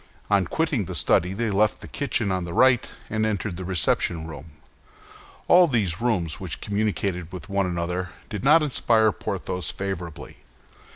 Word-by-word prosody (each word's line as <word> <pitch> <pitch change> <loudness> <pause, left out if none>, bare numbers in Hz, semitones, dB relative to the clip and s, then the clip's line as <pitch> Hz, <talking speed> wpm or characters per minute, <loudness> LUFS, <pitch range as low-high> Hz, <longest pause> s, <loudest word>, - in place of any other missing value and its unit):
On 100 -2 +4
quitting 150 - 0
the - - -5
study 90 +2 +2
they 110 +2 -1
left 105 +2 +2
the - - -9
kitchen 120 -7 -1
on 95 -1 -1
the 85 -1 -5
right, 130 -2 +4 0.2
and 110 0 -1
entered 105 -3 -1
the 95 - -6
reception 85 -2 0
room. 80 -1 -10 0.9
All 180 0 +7
these 105 - 0
rooms, 95 -10 0
which - - -6
communicated 100 -4 -2
with 90 +3 -8
one 100 -1 +1
another, 90 +1 -2 0.2
did 105 0 -5
not 155 +3 +6
inspire 115 -6 +3
Porthos 90 -2 -4
favorably. 90 -5 -5
100 Hz, 160 wpm, -24 LUFS, 90-110 Hz, 0.9 s, All